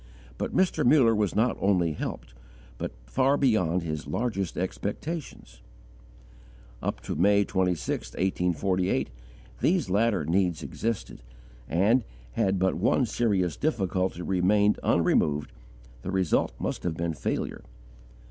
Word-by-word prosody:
But - - -2
Mr. 185 -1 +2
Muller 120 -3 +5
was 105 -3 0
not 115 +3 +2
only 90 -4 +2
helped, - - -6 0.5
but - - -3
far 130 - +2
beyond 90 - +2
his 75 -2 -4
largest 105 -6 -2
expectations. 100 - -5 1.2
Up - - -3
to - - -4
May 100 +2 +3
26, 90 -4 -1
1848, 90 -2 0 0.5
these 170 - +1
latter 105 -4 +2
needs 90 0 +1
existed, 115 - -4 0.5
and, 105 - +3 0.3
had 100 -4 +1
but 95 +1 +2
one 115 +7 +2
serious 100 -7 0
difficulty 95 - -1
remained 100 +3 +2
unremoved, 75 -3 +2 0.5
the 90 - -5
result 95 -9 +1
must - - -3
have 85 -3 -3
been 85 -1 -1
failure. 75 - -3
95 Hz, 120 wpm, -27 LUFS, 90-110 Hz, 1.2 s, Muller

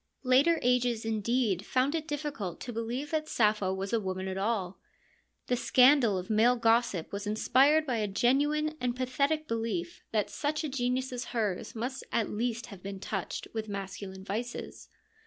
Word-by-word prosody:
Later 275 +6 +4
ages, 245 -2 +2
indeed, 220 -2 0
found 255 +6 +1
it 320 -1 -2
difficult 285 - -4
to 245 - -5
believe 240 +6 -3
that 310 -1 -1
Sappho 210 -4 +2
was 195 +3 -3
a 230 - +3
woman 190 -2 -3
at 190 - -3
all. 195 -2 -1 0.7
The 250 - +1
scandal 250 -4 +5
of 180 0 -4
male 225 +3 +4
gossip 230 -7 +2
was 200 +1 -4
inspired 275 +8 +4
by 250 -5 -1
a 210 -1 0
genuine 295 +9 +2
and 245 -1 0
pathetic 280 +5 0
belief 220 -7 -3
that 215 -2 0
such 300 +1 -1
a 305 - -2
genius 255 0 -1
as 245 - -4
hers 215 -5 -2
must 250 +4 -4
at 225 - 0
least 235 +2 -2
have 200 -6 -11
been 195 0 -6
touched 195 -1 -4
with 220 -1 -4
masculine 195 -1 -6
vices. 230 +5 -5
235 Hz, 170 wpm, -30 LUFS, 200-260 Hz, 0.7 s, scandal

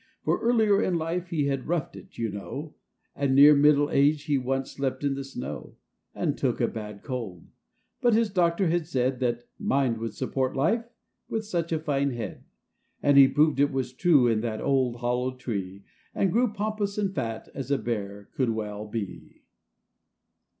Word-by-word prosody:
For, - - +1
earlier 220 -4 +3
in 180 -5 +1
life 165 +2 -2
he 160 -5 -1
had 135 -2 -2
roughed 170 -2 -2
it, - - -13
you 115 - -1
know, 140 +10 -7 0.4
And 140 -1 +1
near 145 +2 +9
middle 145 0 +4
age 145 +1 +3
he 150 -2 0
once 135 0 -1
slept 135 0 -3
in 140 -1 +1
the 135 0 -4
snow, 125 - -7 0.4
And - - -1
took - - -1
a - - +1
had 105 -2 -7
cold; 115 -10 -5 0.6
but 240 -3 +4
his 225 -2 +2
doctor 175 0 +2
had 170 -1 0
said 130 -4 0
That 120 -2 -1 0.2
"mind 130 -4 +1
would 115 0 -5
support 130 0 -1
life, 170 - +1 0.4
with 220 -1 -2
such 170 -5 -2
a 160 - +2
tine 140 -3 0
head," 120 -1 -6 0.6
And 145 0 +4
he 140 -1 +9
proved 150 +1 +2
it 145 +1 +3
was 130 -2 -2
true 145 -2 +4
in 110 -2 +2
that 110 -2 -3
old, 130 -3 +1
hollow 125 +1 -1
tree, 100 -6 -5 0.3
And 195 - +1
grew 240 +2 +2
pompous 210 -1 -2
and 200 -2 0
fat 115 -7 -4
as 135 -2 -6
a 140 - +2
Bear 100 -5 -4
could 130 -3 0
well 105 -1 -4
be 105 -3 -7
135 Hz, 180 wpm, -27 LUFS, 120-165 Hz, 0.6 s, near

